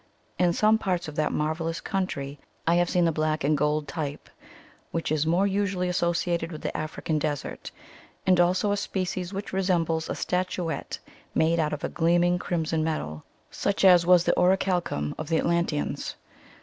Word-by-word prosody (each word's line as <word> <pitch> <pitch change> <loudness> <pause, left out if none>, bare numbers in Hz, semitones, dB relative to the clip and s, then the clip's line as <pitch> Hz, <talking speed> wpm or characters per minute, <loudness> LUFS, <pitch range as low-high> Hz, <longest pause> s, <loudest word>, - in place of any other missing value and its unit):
In 180 -1 +4
some 215 +5 +3
parts 180 -5 -1
of 155 - -6
that 155 0 +1
marvellous 160 +2 -1
country 145 -7 -3 0.3
I 165 - +3
have 175 0 +3
seen 175 -1 +2
the 165 - +3
black 155 0 -1
and 150 +2 +3
gold 150 +1 0
type 150 -3 -5 0.6
which 165 -2 -3
is 155 0 +1
more 175 +4 +3
usually 195 -2 0
associated 170 -1 0
with 155 - -8
the - - -3
African 155 0 -2
desert, 145 -2 -3 0.6
and 185 -1 +4
also 185 +4 +3
a 205 - +1
species 185 -2 -3
which 200 0 -6
resembles 170 -4 0
a - - -2
statu 180 -2 -1
ette - - -5 0.4
made 165 +1 +3
out 155 -2 +1
of 150 -1 -4
a - - -1
gleaming 175 +1 +2
crimson 160 -3 -1
metal, 75 - -3 0.3
such 195 0 0
as 180 -2 +7
was 180 0 +5
the - - +2
orichalcum 180 - +1
of 155 - -5
the 165 - +2
Atlan 170 +1 +2
teans. 150 -2 -3
170 Hz, 175 wpm, -26 LUFS, 155-180 Hz, 0.6 s, as